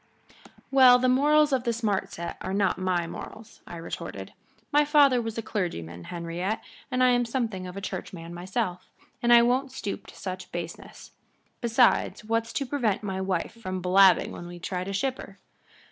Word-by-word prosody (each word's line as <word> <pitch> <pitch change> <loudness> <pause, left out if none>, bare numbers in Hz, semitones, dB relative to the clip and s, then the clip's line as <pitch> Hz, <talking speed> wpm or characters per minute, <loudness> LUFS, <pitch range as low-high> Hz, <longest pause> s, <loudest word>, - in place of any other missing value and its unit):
"Well, 260 -2 +8
the 255 +1 +1
morals 295 +3 +4
of 255 -2 +1
the 240 - +1
smart 220 -4 -1
set 170 0 -6
are 190 +1 -3
not 195 -2 +1
my 180 -2 0
morals," 220 +6 -10
I - - -8
retorted. 165 - -7 0.4
"My 295 0 +5
father 290 -4 +5
was 225 -1 -5
a 230 - -3
clergyman, 85 - -4
Henriette, 175 +5 -3 0.3
and 255 -1 +1
I'm 245 -1 +4
something 230 -6 -3
of 180 +2 -8
a - - -5
churchman 175 -3 -6
myself, 180 +1 -3 0.3
and 240 - +2
I 235 0 +8
won't 255 +3 +1
stoop 205 -6 -5
to - - -13
such 185 -1 -6
baseness. 170 -1 -8 0.5
Besides, 235 -2 +2
what's 230 +1 -1
to 275 - -1
prevent 240 -7 -1
my 190 -2 -3
wife 190 -3 -2
from 185 -3 -3
blabbing 185 0 +5
when 175 - -8
we 175 0 -9
try 180 +1 -4
to 195 - -5
ship 260 +6 -1
her?" - - -10
205 Hz, 175 wpm, -27 LUFS, 180-245 Hz, 0.5 s, Well